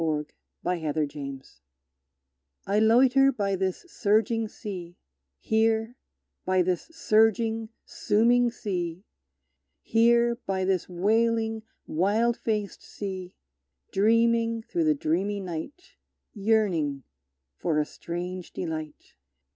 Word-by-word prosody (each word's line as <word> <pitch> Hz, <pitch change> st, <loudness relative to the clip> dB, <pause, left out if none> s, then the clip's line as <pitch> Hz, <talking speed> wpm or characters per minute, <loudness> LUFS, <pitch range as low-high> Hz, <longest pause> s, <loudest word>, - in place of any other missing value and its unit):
Waiting 150 Hz, -2 st, -2 dB, 0.3 s
and 165 Hz, -4 st, -1 dB
Wishing 140 Hz, -3 st, -3 dB, 1.2 s
I 200 Hz, +2 st, +2 dB
loiter 255 Hz, +5 st, +5 dB
by 200 Hz, -6 st, -1 dB
this 190 Hz, -, -2 dB
surging 225 Hz, -3 st, +1 dB
sea, 180 Hz, -5 st, -8 dB, 0.4 s
Here, 225 Hz, -, +1 dB, 0.5 s
by 185 Hz, -1 st, +2 dB
this 180 Hz, 0 st, -1 dB
surging, 225 Hz, -6 st, +2 dB, 0.2 s
sooming 240 Hz, +3 st, +2 dB
sea, 180 Hz, -6 st, -4 dB, 0.8 s
Here, 235 Hz, +1 st, +3 dB
by 190 Hz, -1 st, 0 dB
this 185 Hz, -2 st, 0 dB
wailing, 225 Hz, +4 st, +1 dB, 0.2 s
wild 210 Hz, +8 st, +1 dB
faced 210 Hz, -4 st, -3 dB
sea, 190 Hz, -3 st, -7 dB, 0.6 s
Dreaming 230 Hz, +2 st, +2 dB
through 335 Hz, +6 st, -1 dB
the 310 Hz, -1 st, +3 dB
dreamy 200 Hz, -, -1 dB
night; 195 Hz, -, -7 dB, 0.4 s
Yearning 195 Hz, -, +1 dB, 0.6 s
for 160 Hz, -3 st, 0 dB
a 150 Hz, -, +2 dB
strange 175 Hz, +3 st, -6 dB
delight! 155 Hz, -3 st, -6 dB
205 Hz, 100 wpm, -27 LUFS, 175-230 Hz, 1.2 s, loiter